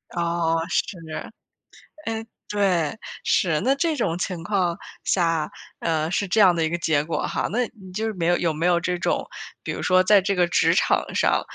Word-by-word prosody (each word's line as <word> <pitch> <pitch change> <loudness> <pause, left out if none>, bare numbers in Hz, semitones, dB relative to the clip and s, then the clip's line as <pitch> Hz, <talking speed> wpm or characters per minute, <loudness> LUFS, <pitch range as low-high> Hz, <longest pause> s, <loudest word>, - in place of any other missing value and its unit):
哦， 170 -1 +1
是。 190 - -1 1.1
诶， 225 0 -2 0.2
对， 190 -6 +1 0.3
是， 165 -7 +2
那 265 - +3
这 315 +3 0
种 165 - 0
情 175 -1 -3
况 180 -3 0 0.3
下， 165 -4 +1 0.3
呃， 160 -1 0
是 200 +2 0
这 205 +4 +1
样 185 -4 +6
的 165 - +1
一 160 - +1
个 170 - -1
结 155 -3 +1
果 155 -1 -2
哈。 - - -1
那 245 +4 +1 0.2
你 185 -1 -11
就 215 +4 -2
是 220 - -2
没 170 -4 -1
有 175 0 +4
有 165 -2 0
没 160 +3 0
有 175 -1 +4
这 180 +1 -1
种， - - -1 0.4
比 - - -3
如 - - -4
说 185 0 +4
在 200 +1 +6
这 200 +1 0
个 180 -1 +3
职 170 - +3
场 - - +3
上， - - +3
175 Hz, 215 characters per minute, -24 LUFS, 165-200 Hz, 1.1 s, 样